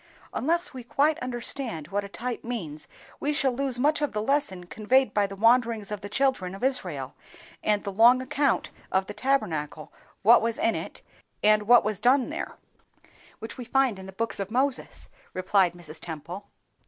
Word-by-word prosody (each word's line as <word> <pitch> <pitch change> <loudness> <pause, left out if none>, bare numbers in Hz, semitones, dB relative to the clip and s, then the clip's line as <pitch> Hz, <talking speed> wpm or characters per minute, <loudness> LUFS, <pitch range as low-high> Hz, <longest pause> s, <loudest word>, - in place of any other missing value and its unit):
"Unless 340 +3 0
we 255 -2 -8
quite 290 +5 +1
understand 240 - -2
what 200 +2 -1
a 200 - -8
type 240 +3 -5
means, 170 -11 -5 0.3
we 290 - 0
shall 280 -3 +3
lose 260 0 -1
much 295 +4 +2
of 295 - -1
the 210 - -1
lesson 220 -9 0
conveyed 220 +5 +1
by 205 -1 +2
the 195 - -8
wanderings 225 -1 +2
of 210 -2 -4
the 205 - -7
children 230 -7 0
of 195 - -10
Israel, 170 - -1 0.5
and 210 -1 +1
the 200 - -4
long 235 +5 +6
account 265 +1 0 0.2
of 190 0 +2
the 210 - -7
Tabernacle, 165 - -1 0.3
what 230 +4 +7
was 230 0 -1
in 225 - +2
it, - - -6 0.4
and 210 0 +4
what 240 +1 +7
was 215 -2 -2
done 250 +3 +3
there, - - -5 0.8
which 225 +4 -8
we - - -4
find 250 -3 +1
in 190 - -9
the - - -8
books 225 +3 -3
of 195 0 -3
Moses," 260 +3 -1 0.3
remarked 185 -1 +2
Mrs. 160 -2 -8
Temple. 170 +5 -7
225 Hz, 180 wpm, -26 LUFS, 195-255 Hz, 0.8 s, what